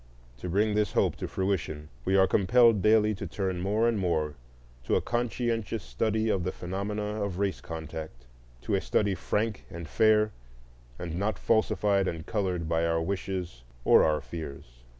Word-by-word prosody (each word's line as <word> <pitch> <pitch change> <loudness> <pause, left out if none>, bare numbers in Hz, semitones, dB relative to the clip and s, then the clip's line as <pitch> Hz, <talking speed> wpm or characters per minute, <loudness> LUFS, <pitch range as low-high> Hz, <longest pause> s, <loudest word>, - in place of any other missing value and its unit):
To 75 - -6
bring 105 +4 +2
this 105 -2 +1
hope - - +2
to - - -4
fruition, 85 -6 -2 0.2
we 95 - +2
are 95 0 +6
compelled 110 +2 +4
daily 110 +1 +4
to 100 - -5
turn 95 -3 -2
more 105 +5 +2
and 115 -3 +1
more 80 -5 0 0.5
to - - +2
a - - +4
conscientious 115 -3 -1
study 110 - 0
of 95 -4 +1
the 90 - -1
phenomena 105 +3 -3
of 100 -3 -3
race 100 -1 -1
contact,—to - - -8
a - - +2
study 105 -2 +1
frank 105 +2 -2
and 85 -1 -7
fair, 110 +4 +3 0.7
and 85 -2 -5
not 105 +2 0
falsified 105 -3 +2
and 80 -3 -4
colored 90 -6 -1
by 80 0 +1
our 85 0 +1
wishes 90 -5 -3 0.2
or - - +7
our 75 -1 +2
fears. 70 -3 -8
95 Hz, 165 wpm, -28 LUFS, 80-105 Hz, 0.7 s, or